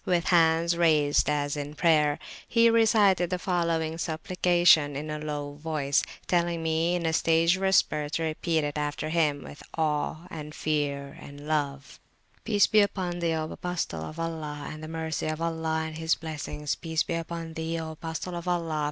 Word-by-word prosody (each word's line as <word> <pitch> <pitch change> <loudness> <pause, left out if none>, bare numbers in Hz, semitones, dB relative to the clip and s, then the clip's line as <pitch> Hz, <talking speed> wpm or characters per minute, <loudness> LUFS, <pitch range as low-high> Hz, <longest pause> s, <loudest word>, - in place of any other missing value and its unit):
317] 170 -2 +4
with - - -1
hands 170 0 0
raised 155 -4 +3
as 145 -1 0
in 145 0 -5
prayer, 150 -3 +3 0.3
he 230 0 +4
recited 210 -6 +4
the 180 - -1
following 170 -3 -1
supplication 170 -2 +3
in 150 +2 -4
a 150 - -3
low 145 -1 -4
voice, 145 -2 0 0.2
telling 170 -1 0
me 160 +2 +1
in 175 -1 -2
a 160 - +1
stage 165 +2 +3
whisper 190 -6 +2
to 165 +2 -2
repeat 160 0 0
it 145 0 -2
after 150 +1 -2
him 155 -3 +1
with 145 - -11 0.2
awe, 155 +1 -1
and 150 -1 -7
fear, 145 -2 -2
and 145 +1 -11
love: 140 -3 -2 0.4
"Peace 205 -3 +4
be 215 -1 +4
upon 185 -3 -1
Thee, 165 -1 0
O 155 0 -3
Apostle 175 - -3
of 155 - -7
Allah, 155 -3 -4
and 155 - -8
the 155 - -7
Mercy 160 -2 -3
of 155 0 -2
Allah 160 -1 -1
and 160 0 -6
his 160 0 +2
Blessings! 150 -2 -4
Peace 160 -2 -1
be - - -4
upon 165 0 -4
Thee, 160 +1 -3
O 160 -1 -5
Apostle 160 +3 -5
of 170 +1 -6
Allah! 165 -3 -1
160 Hz, 180 wpm, -27 LUFS, 150-170 Hz, 0.4 s, 317